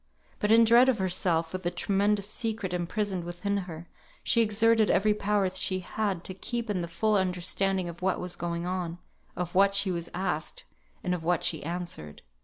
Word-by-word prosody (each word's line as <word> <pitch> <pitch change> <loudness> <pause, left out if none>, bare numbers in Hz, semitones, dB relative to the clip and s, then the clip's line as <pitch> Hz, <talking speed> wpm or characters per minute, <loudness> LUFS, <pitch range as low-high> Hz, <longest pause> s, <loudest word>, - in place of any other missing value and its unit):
But 210 - +1
in 230 +1 +7
her - - +6
dread 240 +3 +6
of 250 - +2
herself, 175 -3 0
with 185 - -3
the 175 - 0
tremendous 200 +3 +1
secret 215 -4 -3
imprisoned 185 +1 -1
within 175 +4 -3
her, 165 +1 -8 0.4
she 230 - +3
exerted 225 0 +3
every 210 +3 +3
power 205 -1 +1
she 185 0 -1
had 195 -2 -2
to 185 - -4
keep 235 +3 -3
in 185 -3 -1
the 170 - -3
full 215 +6 0
understanding 185 0 0
of 170 +1 -8
what 190 0 +1
was 180 0 -4
going 170 0 -3
on, 180 -2 -3 0.4
of 175 -1 -4
what 195 +1 +4
she 200 -1 +3
was 170 -1 -3
asked, 175 -4 -3 0.4
and 180 - 0
of 180 - -2
what 175 +1 +1
she 160 - 0
answered. 170 - -5
185 Hz, 195 wpm, -28 LUFS, 175-210 Hz, 0.4 s, in